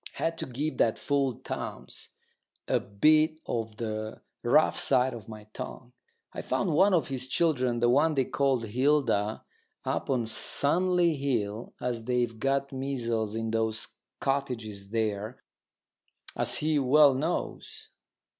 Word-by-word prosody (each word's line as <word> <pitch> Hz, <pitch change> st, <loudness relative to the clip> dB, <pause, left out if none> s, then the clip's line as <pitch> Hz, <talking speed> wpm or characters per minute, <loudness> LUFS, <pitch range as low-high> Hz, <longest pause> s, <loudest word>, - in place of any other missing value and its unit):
Had 165 Hz, 0 st, -2 dB
to -, -, -4 dB
give 145 Hz, +5 st, -3 dB
that 110 Hz, -, +3 dB
fool 140 Hz, -3 st, 0 dB
Townes -, -, -7 dB, 0.6 s
a -, -, +2 dB
bit 155 Hz, +9 st, +3 dB
of 110 Hz, -2 st, -3 dB
the 110 Hz, -1 st, -5 dB, 0.2 s
rough -, -, +3 dB
side 130 Hz, +1 st, +4 dB
of 115 Hz, -1 st, -9 dB
my 110 Hz, -1 st, -9 dB
tongue. 125 Hz, -1 st, -8 dB, 0.4 s
I -, -, -5 dB
found 150 Hz, +8 st, -1 dB
one 190 Hz, +5 st, +5 dB
of 155 Hz, -7 st, 0 dB
his 130 Hz, -1 st, -3 dB
children, 130 Hz, -6 st, +1 dB
the 120 Hz, -, +4 dB
one 150 Hz, +6 st, +3 dB
they 135 Hz, -2 st, +2 dB
call 135 Hz, -2 st, +1 dB
Hilda, 115 Hz, -2 st, +1 dB, 0.4 s
up -, -, -2 dB
on 125 Hz, -4 st, +1 dB
Sunley 170 Hz, +8 st, +2 dB
Hill, 115 Hz, -6 st, -2 dB
and 125 Hz, -1 st, -1 dB
they've 120 Hz, -2 st, 0 dB
got 140 Hz, +2 st, 0 dB
measles 120 Hz, -5 st, -2 dB
in 115 Hz, 0 st, -2 dB
those 110 Hz, -1 st, -1 dB, 0.3 s
cottages 115 Hz, -8 st, -3 dB
there, 110 Hz, +1 st, -2 dB, 0.9 s
as -, -, +1 dB
he 155 Hz, -1 st, +1 dB
well 140 Hz, +1 st, +6 dB
knows. 155 Hz, +7 st, -4 dB
125 Hz, 135 wpm, -28 LUFS, 110-140 Hz, 0.9 s, well